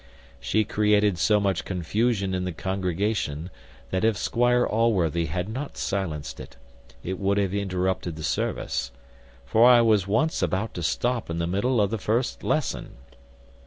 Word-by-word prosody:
She 110 - +1
created 105 -3 +2
so 105 -1 +4
much 100 -3 0
confusion 100 +3 -1
in 90 0 -1
the 90 - -2
congregation, 90 -2 -2 0.4
that 95 - 0
if 110 -2 +2
Squire 120 +4 +2
Allworthy 90 -8 +1
had 90 +4 -3
not 130 +6 -6
silenced 85 -7 -3
it, - - -11 0.5
it 95 +1 -4
would 100 +1 +1
have 100 -2 0
interrupted 95 -3 -1
the 80 - -8
service: - - -2 0.6
for 115 +3 +5
I 120 -1 +7
was 105 -5 +3
once 150 +11 +1
about 100 +3 -1
to 90 - -5
stop 120 +8 -1
in 85 - -3
the 85 - 0
middle 100 +8 +1
of 100 -1 +2
the 115 - -2
first 115 +6 -1
lesson. - - -1
100 Hz, 160 wpm, -25 LUFS, 90-110 Hz, 0.6 s, I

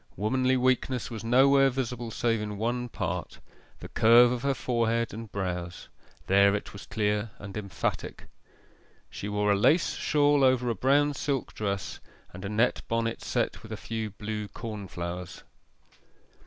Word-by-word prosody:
Womanly 130 +5 +1
weakness 130 0 0
was 115 -1 -6
nowhere 135 +3 +5
visible 125 -2 -3
save 115 0 0
in 105 -1 -4
one 120 +3 -2
part - - -4 0.4
the - - -7
curve 120 +2 +6
of 125 -1 -2
her 140 0 0
forehead 115 -3 0
and 110 0 -8
brows 90 -3 -4 0.4
there 100 +1 +5
it 105 - -5
was 100 - -10
clear 105 -2 0
and 100 -1 -9
emphatic. 100 -3 -4 0.9
She 100 - -5
wore 105 0 +1
a - - +4
lace 150 - +3
shawl 145 -1 +2
over 125 -2 +3
a - - +1
brown 145 +6 +3
silk 140 -2 -2
dress, 100 -2 -3 0.3
and 90 - -9
a 100 - -3
net 110 +4 +1
bonnet 115 0 -1
set 95 - -1
with 110 -1 -12
a 110 - -4
few 110 0 -4
blue 105 +1 -5
cornflowers. 90 -6 -6
115 Hz, 155 wpm, -28 LUFS, 105-125 Hz, 0.9 s, curve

